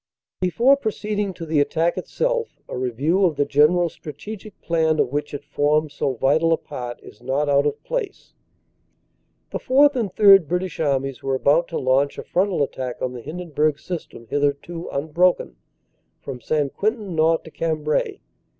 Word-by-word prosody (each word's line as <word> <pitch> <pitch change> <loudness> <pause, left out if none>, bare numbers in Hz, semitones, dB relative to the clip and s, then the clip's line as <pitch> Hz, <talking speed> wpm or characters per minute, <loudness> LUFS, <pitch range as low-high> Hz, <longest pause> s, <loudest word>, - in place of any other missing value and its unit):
Before 230 +9 +4
proceeding 210 -5 -2
to 165 - -7
the 155 -2 +1
attack 165 +4 +1
itself, - - -2
a - - -6
review 130 - 0
of 170 -5 +3
the 145 0 +1
gen 145 +2 +5
eral 175 -1 +1
strategic 200 +8 -9
plan 160 -2 +1
of - - +2
which 145 +1 -2
it 145 0 -7
formed 150 +1 +1
so 135 -2 -2
vital 150 +7 +2
a 165 - +4
part, 120 -1 -7
is 105 - -14
not 135 +4 -1
out 140 0 +3
of 145 0 -4
place. 470 -6 -4 1.2
The - - -3
Fourth 285 +2 +4
and 225 -7 -1
Third 195 -4 +7
British 180 +1 -2
Armies 135 -4 -1
were 135 -1 -1
about 150 +6 +3
to 165 - -4
launch 135 +2 +1
a - - -5
frontal 185 -4 +1
attack 130 -2 -4
on 125 0 -2
the 125 - -7
Hindenburg 155 -1 -1
System, 165 -9 -7
hitherto 145 +6 -2
unbroken, 155 - +1 0.6
from 125 -2 -7
St. 145 +2 -1
Quentin 215 -3 -1
north 160 +1 +3
to 160 - -12
Cambrai. 155 -2 -1
155 Hz, 170 wpm, -22 LUFS, 140-185 Hz, 1.2 s, Third